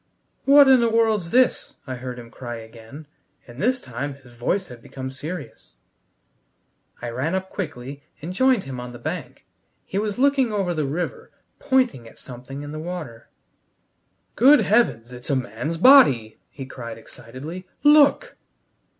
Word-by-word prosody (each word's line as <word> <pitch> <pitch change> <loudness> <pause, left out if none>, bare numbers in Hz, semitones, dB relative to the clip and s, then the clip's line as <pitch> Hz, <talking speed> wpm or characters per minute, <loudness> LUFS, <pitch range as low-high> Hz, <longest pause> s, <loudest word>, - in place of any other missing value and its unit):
"What 280 0 +7
in 260 -1 +7
the 235 - +2
world's 220 -6 +1
this?" 255 +4 +2
I 130 - -5
heard 125 0 -7
him 120 -1 -11
cry 120 -2 -7
again, 115 +6 -12 0.4
and 120 +2 -10
this 250 +4 +1
time 135 - -6
his 130 -3 -18
voice 175 +11 -2
had 120 -2 -11
become 130 +1 -7
serious. 145 - -8 1.3
I 120 - -3
ran 140 +9 -2
up 190 0 -4
quickly 140 -6 -6 0.2
and 170 +5 -6
joined 260 0 +3
him 130 -2 -7
on 125 0 -8
the - - -9
bank. - - -6 0.4
He 195 - -3
was 210 -1 -2
looking 270 -2 +2
over 195 -4 -1
the 155 -4 -1
river, 165 +6 -4 0.3
pointing 255 - +1
at - - -16
something 130 +3 -9
in 145 - -7
the 155 - -6
water. 155 -9 -7 1.1
"Good 275 +7 +6
Heavens, 160 - +1
it's 125 +1 -9
a 140 - +2
man's 130 +5 -3
body!" 165 - +6
he 135 - -9
cried 115 -3 -8
excitedly. 145 +11 -10 0.2
"Look!" 295 - +5
145 Hz, 160 wpm, -23 LUFS, -, 1.3 s, What